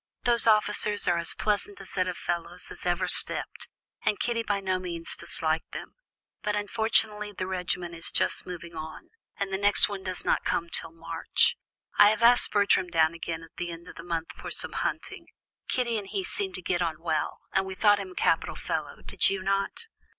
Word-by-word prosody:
Those 235 -1 +2
officers 210 -1 +2
are 175 -1 +3
as 170 - +4
pleasant 205 -1 -1
a 195 - -10
set 185 -1 -1
of 180 - -4
fellows 170 -1 -4
as - - -7
ever - - +1
stepped, - - +2 0.4
and 205 - +1
Kitty 235 -1 0
by 205 -3 -1
no 185 -1 -1
means 170 -2 -4
disliked 160 -1 -3
them; - - -7 0.5
but 210 -1 -1
unfortunately 210 0 +1
the 185 - -4
regiment 180 -2 -2
is 165 0 -5
just 185 - +3
moving 170 -2 -8
on, 160 0 -8 0.3
and 195 -1 -3
the 190 - 0
next 205 0 +5
one 200 -2 -5
does 185 -1 -3
not - - +1
come 170 0 -1
till 165 - +2
March. 165 - +2 0.4
I 205 - +9
have 215 +1 0
asked 240 +1 +7
Bertram 200 -2 +3
down 165 -2 +2
again 165 0 -5
at 165 0 -16
the 175 -1 -3
end 170 0 -9
of - - -11
the 170 - -9
month 165 -1 -3
for - - -8
some - - 0
hunting; - - -4 0.4
Kitty 235 -4 0
and 200 - -9
he 385 - -3
seemed 385 +2 -3
to 185 - -8
get 175 0 0
on 165 -2 -1
well, 165 -2 -2
and 190 0 +1
we 190 - -6
thought 205 0 +4
him 190 -2 -7
a - - -24
capital - - +1
fellow, - - -4
did - - +3
you 195 -1 -3
not?" 195 - -1
190 Hz, 205 wpm, -27 LUFS, 170-210 Hz, 0.5 s, I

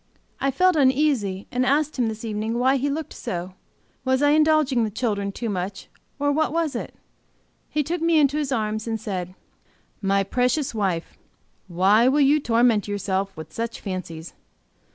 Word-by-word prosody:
I 275 - +1
felt 365 +6 +3
uneasy 260 -9 +2
and 250 +1 +1
asked 290 +2 +1
him, 240 - +2
this 220 +1 -5
evening, 220 +1 -2
why 260 +3 +3
he 280 +2 -1
looked 310 +2 -4
so. 180 +1 -5 0.5
Was 260 +1 +1
I 290 - +5
indulging 305 -5 +3
the 220 - 0
children 205 -3 -2
too 230 +4 -5
much, 195 -1 -4 0.3
or 285 0 +1
what 315 +2 +1
was 325 -4 -1
it? - - -5 0.7
He 300 - 0
took 335 +4 -3
me 330 -1 +3
into 290 0 +3
his 285 -2 -2
arms 215 -2 -1
and 225 -1 -2
said: 185 -4 -5 0.7
"My 195 0 +2
precious 250 +7 0
wife, 190 -6 -2 0.5
why 195 +6 +4
will 275 +3 +3
you 290 +2 +5
torment 230 -5 +2
yourself 195 -1 -2
with 160 0 -9
such 230 0 -4
fancies? 180 -4 -6
235 Hz, 170 wpm, -23 LUFS, 200-285 Hz, 0.7 s, I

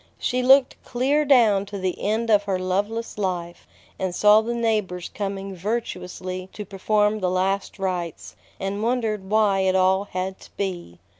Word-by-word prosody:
She 250 +1 -1
looked 265 +1 +4
clear 280 +5 +1
down 220 -8 +4
to 200 0 -6
the 185 -1 -3
end 220 +2 0
of 205 -1 +4
her 195 -2 0
loveless 205 +5 -2
life, 175 -3 -3 0.3
and 185 -2 -2
saw 210 +2 +6
the 235 +2 -3
neighbors 210 -6 -1
coming 195 -1 -4
virtuously 185 -2 -4
to 210 - -7
perform 210 +2 +1
the 185 -2 0
last 190 +2 -1
rites, 180 -4 -4 0.2
and 195 +2 -3
wondered 220 -4 -1
why 210 -2 +3
it 190 0 +2
all 190 +1 +3
had 190 0 -4
to - - -15
be. 175 - -4
200 Hz, 160 wpm, -23 LUFS, 185-220 Hz, 0.3 s, saw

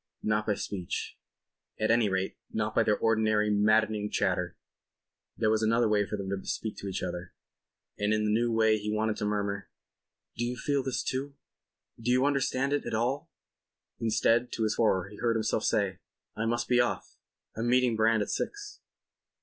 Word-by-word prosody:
Not 105 0 0
by 105 - +2
speech. 95 -3 -4 0.6
At 110 +1 +2
any 115 -2 +3
rate 95 0 -1 0.2
not 110 0 -1
by - - +4
their 105 - +2
ordinary 110 -1 +2
maddening 105 0 +2
chatter. 90 -4 0 0.8
There 110 - +2
was 110 0 +2
another 115 +1 +3
way 105 -1 +2
for 105 - -3
them 100 -1 -5
to 95 -1 -3
speak 110 - -3
to 100 - -6
each 95 - -3
other, 90 0 -5 0.6
and 105 +1 +1
in 110 0 +2
the 105 - +1
new 115 +2 +2
way 110 -1 +3
he 105 +1 -4
wanted 110 0 0
to - - -2
murmur: 100 -1 -2 0.7
"Do 120 - -2
you 120 +1 -1
feel 140 0 0
this 130 -2 -2
too? 140 +2 -3 0.7
Do 115 - -2
you 130 +2 +4
understand 140 -1 +1
it 145 - -1
at - - -2
all?"... 125 +5 -1 0.7
Instead, 115 +2 +2
to 115 - -1
his 110 - +1
horror, 95 -5 +2
he 105 +1 -12
heard 115 -1 +1
himself 110 0 0
say: 100 -3 +1 0.4
"I 110 +1 -1
must 120 +1 0
be 125 -1 +3
off; 120 - -2 0.4
I'm 115 +2 -1
meeting 125 -2 +3
Brand 110 0 +3
at - - -5
six." 410 0 -4
110 Hz, 185 wpm, -29 LUFS, 105-120 Hz, 0.8 s, by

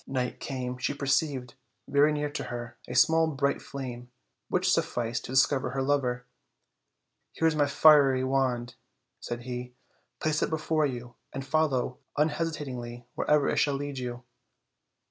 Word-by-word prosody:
S3 - - -6
night 125 -2 -1
came 125 -2 -4
she 145 - -1
perceived, 140 -3 0 0.3
very 145 +2 +4
near 150 0 -1
to 145 -2 -4
her, 120 -1 -6
a 125 - -5
small 160 +5 +5
bright 140 -2 0
flame, 125 -3 -7 0.4
which - - +2
sufficed 115 0 -1
to - - -7
discover 130 +1 +3
her 135 0 -2
lover. 125 -3 0 1.1
"Here 165 - +2
is 160 - +1
my 145 -1 +3
fiery 140 -3 +6
wand," 130 -2 0 0.5
said 120 0 -5
he; 125 0 -6 0.4
"place 155 -1 0
it - - +1
before 155 -1 +1
you, 120 -2 -6 0.2
and 135 - -5
follow 135 -4 0 0.2
un 150 +2 +4
hesitatingly 130 -7 -4
wherever 150 -2 +2
it - - 0
shall 145 -1 +2
lead 140 -1 -4
you. 125 0 -5
135 Hz, 155 wpm, -28 LUFS, 125-145 Hz, 1.1 s, fiery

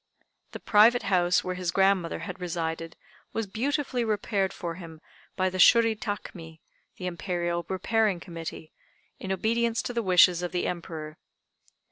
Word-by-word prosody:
The - - -6
private 225 +4 +5
house, 175 -1 +3
where 185 - -3
his 180 -1 -3
grandmother 190 -2 +2
had 190 -1 -7
resided, 165 -1 -4 0.4
was 225 - -1
beautifully 255 +4 -1
repaired 205 -3 0
for 170 -1 -5
him 165 -2 -10 0.4
by 185 - +1
the 185 - -5
Shuri 230 +2 +6
Takmi 175 -6 -7 0.4
the 180 - -6
Imperial 175 -1 -2
Repairing 205 0 +1
Committee 165 -2 -8 0.5
in 190 - -5
obedience 230 +4 0
to 245 - -4
the 235 - 0
wishes 180 -3 +5
of 175 0 -4
the 180 - -1
Emperor. 160 -3 -5
185 Hz, 145 wpm, -27 LUFS, 170-215 Hz, 0.5 s, Shuri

